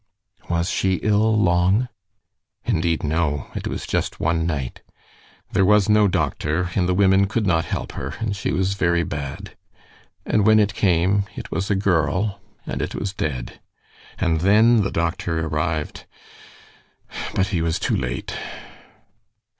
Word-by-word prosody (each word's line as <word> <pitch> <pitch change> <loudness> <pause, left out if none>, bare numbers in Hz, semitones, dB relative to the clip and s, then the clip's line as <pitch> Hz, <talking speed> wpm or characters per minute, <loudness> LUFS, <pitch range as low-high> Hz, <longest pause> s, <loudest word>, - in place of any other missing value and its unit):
"Was 85 0 0
she 95 -1 +1
ill 110 +1 +3
long?" 95 +5 +3 0.8
"Indeed, 80 0 0
no. 75 -2 -1
It - - -4
was - - -4
just - - -2
one 85 0 0
night. 70 -7 -3 0.7
There 95 - +3
was 105 +1 +4
no 105 -1 +5
doctor, 85 0 -1
and 90 -2 +1
the 90 - +2
women 95 0 +4
could 110 +2 -1
not 85 -3 +2
help - - -4
her, - - -5
and 110 -3 -2
she 100 - -2
was 95 +1 0
very 85 -3 +1
bad 70 -3 -6 0.7
and 105 - +2
when 110 +1 +6
it 105 -2 +2
came 95 +1 +2
it - - -8
was 95 - -2
a 100 - +2
girl 95 +1 0 0.2
and - - -3
it - - -3
was 100 -1 -3
dead 65 -10 -4 0.6
and 80 -1 +1
then 110 +4 +5
the 100 - 0
doctor 85 -1 -1
arrived, 75 0 -3 1.3
but 95 +1 +1
he 90 -5 0
was 80 0 0
too - - 0
late." 60 -2 -3
90 Hz, 150 wpm, -22 LUFS, 80-100 Hz, 1.3 s, when